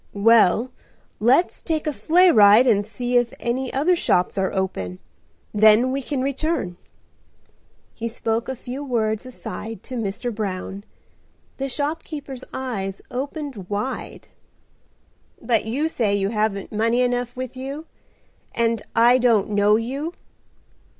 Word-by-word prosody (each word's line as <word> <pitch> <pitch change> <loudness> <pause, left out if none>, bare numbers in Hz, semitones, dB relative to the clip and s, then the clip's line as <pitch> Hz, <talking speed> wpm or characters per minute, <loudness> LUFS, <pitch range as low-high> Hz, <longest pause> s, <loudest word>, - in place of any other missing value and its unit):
"Well, 230 +2 +4 0.5
let's 260 +11 +3
take 315 -2 -2
a 305 - -1
sleigh 355 +5 +4
ride 210 +1 +7
and 205 -4 +2
see 245 +3 -1
if 240 -1 +1
any 250 +2 -2
other 310 +7 +2
shops 180 - +1
are 190 -1 0
open. 95 - -3 0.6
Then 215 +4 +5
we 275 +1 -1
can 265 0 -2
return." 275 - -2 1.2
He 230 - -4
spoke 230 0 -2
a 265 - -3
few 255 +3 -7
words 225 -3 -1
aside 225 -4 -7
to 255 - -7
Mr. 225 +2 -3
Brown. 200 -1 -4 0.7
The 275 0 -3
shopkeeper's 290 -1 -4
eyes 200 -7 -4
opened 270 - -5
wide. 210 +6 -4 1.1
"But 230 -2 +1
you 270 +8 0
say 220 -10 0
you 195 -1 0
haven't 210 -2 -1
money 230 +3 +1
enough 245 -1 -1
with 255 0 -6
you, 275 +4 -6 0.7
and 230 -1 +1
I 240 +2 +6
don't 225 -5 +3
know 205 +1 +4
you?" 275 +9 -3
235 Hz, 130 wpm, -22 LUFS, 210-265 Hz, 1.2 s, ride